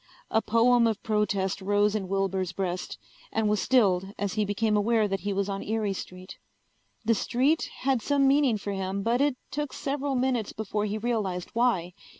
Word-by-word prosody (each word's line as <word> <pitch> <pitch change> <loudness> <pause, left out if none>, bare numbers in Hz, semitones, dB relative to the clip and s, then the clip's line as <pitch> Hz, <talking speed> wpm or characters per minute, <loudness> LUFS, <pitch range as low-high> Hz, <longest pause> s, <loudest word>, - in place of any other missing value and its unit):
A 220 - +3
poem 235 +2 +4
of 220 -1 -2
protest 200 -3 0
rose 205 +1 +2
in 205 -3 -2
Wilbur's 190 -1 -1
breast, 185 -2 -3 0.3
and 220 -1 +1
was 210 -2 +1
stilled 195 -6 +2
as 200 -2 -2
he 215 - +1
became 210 +1 0
aware 215 +1 +2
that 195 -1 -2
he 205 - -3
was 200 0 -1
on 195 -1 -3
Erie 215 -2 -1
street. 185 0 -9 0.7
The 230 - +4
street 260 +8 +1
had 260 -2 +1
some 280 +1 +2
meaning 270 -4 +3
for 205 0 -5
him 195 0 -3
but 235 +4 +1
it 285 -3 +2
took 295 0 -3
several 280 0 -2
minutes 250 -4 0
before 210 -1 -2
he 210 +1 -2
realized 210 -6 -2
why. 210 -8 +1
210 Hz, 180 wpm, -27 LUFS, 195-240 Hz, 0.7 s, poem